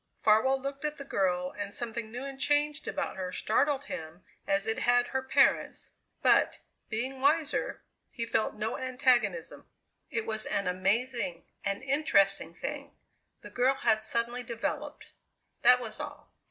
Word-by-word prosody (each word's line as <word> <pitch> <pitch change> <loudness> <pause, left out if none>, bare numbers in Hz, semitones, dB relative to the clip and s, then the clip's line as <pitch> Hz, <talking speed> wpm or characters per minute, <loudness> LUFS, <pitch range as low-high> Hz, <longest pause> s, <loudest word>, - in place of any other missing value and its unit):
Farwell 240 +5 +4
looked 275 +2 -5
at 300 0 -2
the 280 - -8
girl 180 -6 0
and 205 -1 -4
something 230 0 -4
new 245 +3 -5
and 270 -1 -7
changed 295 +2 +1
about 280 -8 -3
her 185 -1 -3
startled 275 +9 +1
him 160 - -7 0.2
as 195 +1 +1
it 225 0 0
had 245 0 +4
her 265 +1 -2
parents, 260 - +2 0.3
but, - - +4 0.3
being 255 +4 -3
wiser, 300 +2 +1 0.3
he 230 - -4
felt 220 -1 0
no 215 +2 -3
antagonism. 250 - +1 0.4
It 225 -1 -2
was 220 -1 -2
an 200 - -1
amazing, 195 +1 0 0.2
an 200 +4 -2
interesting 200 - +2
thing. - - -6 0.5
The - - -10
girl 255 +2 +3
had 220 -4 +2
suddenly 235 +2 -1
developed: 235 -1 -4 0.6
that 250 +1 +7
was 225 +1 -5
all. 295 0 -8
240 Hz, 150 wpm, -30 LUFS, 205-270 Hz, 0.6 s, that